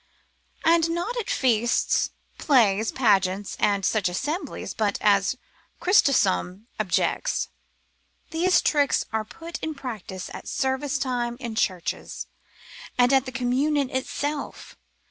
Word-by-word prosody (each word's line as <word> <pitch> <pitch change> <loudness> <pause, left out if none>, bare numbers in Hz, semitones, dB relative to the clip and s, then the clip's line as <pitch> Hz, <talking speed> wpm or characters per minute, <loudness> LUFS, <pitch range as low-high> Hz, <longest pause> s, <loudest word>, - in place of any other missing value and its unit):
And 330 0 +4
not 345 +8 -2
at 465 - -3
feasts, 240 -2 +2 0.3
plays, 225 -6 +3
pageants, 200 -5 +1
and 200 -2 +2
such 205 -5 +1
assemblies, 295 - -4
but 210 -3 0
as 205 +4 +3 0.4
Chrysostom 210 - +2
objects, 200 -4 0 0.8
these 355 +3 +3
tricks 290 -2 +2
are 220 -1 0
put 330 +9 -8
in 315 -1 -4
practice 215 -9 -6
at - - -9
service 265 +2 -1
time 245 -3 -2
in 235 -4 -5
churches, 185 -6 -2 0.7
and 245 +2 +4
at 265 -1 +3
the - - -4
communion 260 +3 0
itself. 285 +3 -4
250 Hz, 115 wpm, -25 LUFS, 210-290 Hz, 0.8 s, And